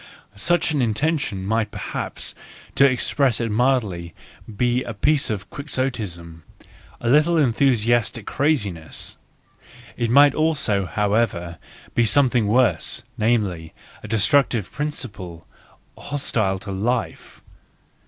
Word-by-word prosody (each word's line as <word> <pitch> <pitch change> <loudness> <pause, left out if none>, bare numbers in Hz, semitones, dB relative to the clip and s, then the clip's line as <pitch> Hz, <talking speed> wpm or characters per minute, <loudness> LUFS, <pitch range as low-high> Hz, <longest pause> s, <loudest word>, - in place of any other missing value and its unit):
Such 175 +10 +1
an 145 -3 0
intention 120 - -1
might 110 +2 0
perhaps, - - -6 0.4
to 140 +1 +5
express 130 0 +1
it 115 -2 -2
mildly, 105 -9 0 0.4
be 125 +2 +1
a 115 - -7
piece 145 +7 +1
of 105 -3 -4
Quixotism, 110 - -4 0.6
a 120 - -4
little 150 +6 +4
enthusiastic 120 -4 +2
craziness; 105 - -2 0.8
it 120 -1 -1
might 140 +3 +6
also, 145 - +1
however, 100 -2 -1 0.3
be 120 -1 +2
something 125 -3 +3
worse, 120 +3 +1
namely, 100 -8 -1 0.3
a - - -9
destructive 115 0 +2
principle, 105 - -6 0.5
hostile 110 -9 -1
to 100 +1 -8
life. 115 +5 -3
115 Hz, 105 wpm, -22 LUFS, 100-135 Hz, 0.8 s, might